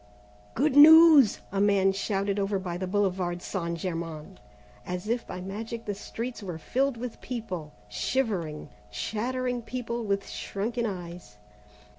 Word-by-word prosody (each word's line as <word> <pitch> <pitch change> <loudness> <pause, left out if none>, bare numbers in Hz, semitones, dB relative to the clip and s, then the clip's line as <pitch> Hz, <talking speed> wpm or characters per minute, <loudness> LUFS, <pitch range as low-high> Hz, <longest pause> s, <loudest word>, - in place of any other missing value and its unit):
"Good 285 +1 +1
news!" 310 -4 +8
a 195 0 0
man 200 -1 +4
shouted 200 0 -1
over 200 0 0
by 180 -2 -4
the 185 +1 -3
Boulevard 185 -3 0
St. 170 -3 -3
Germain. 165 0 -5 0.4
As 180 +2 -5
if 235 +1 -1
by 180 - -6
magic 220 +5 -6
the 205 - -2
streets 230 +4 -6
were 180 -5 -5
filled 265 - -1
with 240 0 -7
people, 185 -11 -5 0.2
shivering, 155 - -2 0.2
chattering 245 - -2
people 235 0 -4
with 200 -2 -1
shrunken 230 +4 -3
eyes. 175 - -8
200 Hz, 135 wpm, -27 LUFS, 180-235 Hz, 0.4 s, news